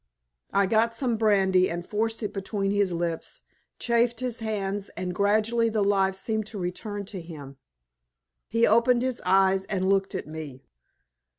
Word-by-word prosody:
I 200 0 +3
got 225 +3 +2
some 240 -1 +1
brandy 195 -4 +3
and 175 +1 -4
forced 225 +3 -2
it 210 - -3
between 195 0 -2
his 200 -2 +1
lips, 170 -1 -4 0.3
chafed 235 0 +1
his 250 -2 -2
hands, 205 -3 -3
and 180 -1 -3
gradually 215 +4 +2
the 215 -2 0
life 195 -1 +2
seemed 215 +2 -2
to 215 - -8
return 200 +3 -4
to 190 -1 -7
him. 145 -5 -10 0.9
He 230 +1 +3
opened 235 +2 +4
his 255 -2 -2
eyes 190 0 +3
and 190 -2 -1
looked 195 0 +1
at - - -3
me. 150 -4 -8
200 Hz, 160 wpm, -26 LUFS, 190-225 Hz, 0.9 s, opened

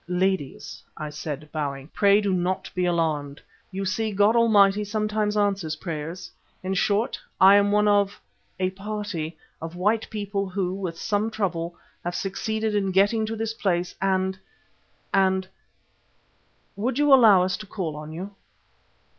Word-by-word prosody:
"Ladies," 180 -5 -2 0.2
I 150 -1 -5
said, 150 0 -6
bowing, 140 -3 -3
"pray 200 +2 +4
do 200 -2 0
not 185 +1 -1
be 180 0 0
alarmed. 155 -5 -1 0.3
You 195 0 -4
see 215 +4 -1
God 205 +3 +3
Almighty 210 -3 +5
sometimes 210 0 -1
answers 195 -6 0
prayers. 165 +1 -6 0.3
In 190 +1 -1
short, 205 +4 +1 0.2
I 190 +1 +8
am 200 0 +4
one 210 0 +3
of 205 -1 +2 0.4
a 185 0 +1
party 195 -5 -5 0.2
of 165 +1 -6
white 210 +5 0
people 200 -2 -3
who, 185 -1 -2
with 185 -4 -4
some 205 +4 0
trouble, 175 -6 -2 0.3
have 175 +1 -3
succeeded 220 +3 -2
in 200 -2 +1
getting 205 +4 +3
to 225 - -3
this 225 0 -2
place 180 -5 -1
and 190 0 0 0.7
and 190 -1 +2 1.3
would 235 +5 -2
you 295 -1 +5
allow 215 -8 +7
us 185 +1 0
to 215 - -10
call 180 -7 -4
on 150 +1 -8
you?" 185 +5 -6
195 Hz, 150 wpm, -25 LUFS, 175-210 Hz, 1.3 s, I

